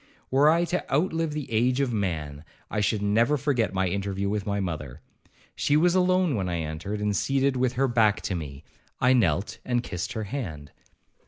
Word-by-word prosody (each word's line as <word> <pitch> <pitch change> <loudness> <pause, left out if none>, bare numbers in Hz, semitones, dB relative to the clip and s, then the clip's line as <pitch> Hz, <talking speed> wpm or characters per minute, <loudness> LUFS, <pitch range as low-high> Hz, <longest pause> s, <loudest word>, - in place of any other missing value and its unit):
Were 140 +3 +5
I 170 +2 +3
to 180 +2 -3
outlive 160 +1 +1
the 150 -2 -3
age 125 +4 +2
of 135 -4 0
man, 80 -8 -3 0.3
I 105 - -1
should 105 +1 0
never 115 +8 +3
forget 130 -8 0
my 95 0 0
interview 100 +1 -2
with 105 0 -2
my 100 0 0
mother. 75 -9 -4 0.6
She 145 - +2
was 175 +2 +4
alone 185 -2 +3
when 95 -6 -1
I 85 - -1
entered, 80 +7 -4
and 105 -1 0
seated 135 +4 +1
with 125 -1 +1
her 135 +2 +1
back 110 -4 +3
to - - -2
me. 75 -4 -6 0.4
I 125 +1 +4
knelt 100 -6 +1
and 120 -1 0
kissed 90 +6 -4
her 110 -3 -3
hand. 95 - -6
110 Hz, 190 wpm, -26 LUFS, 95-135 Hz, 0.6 s, Were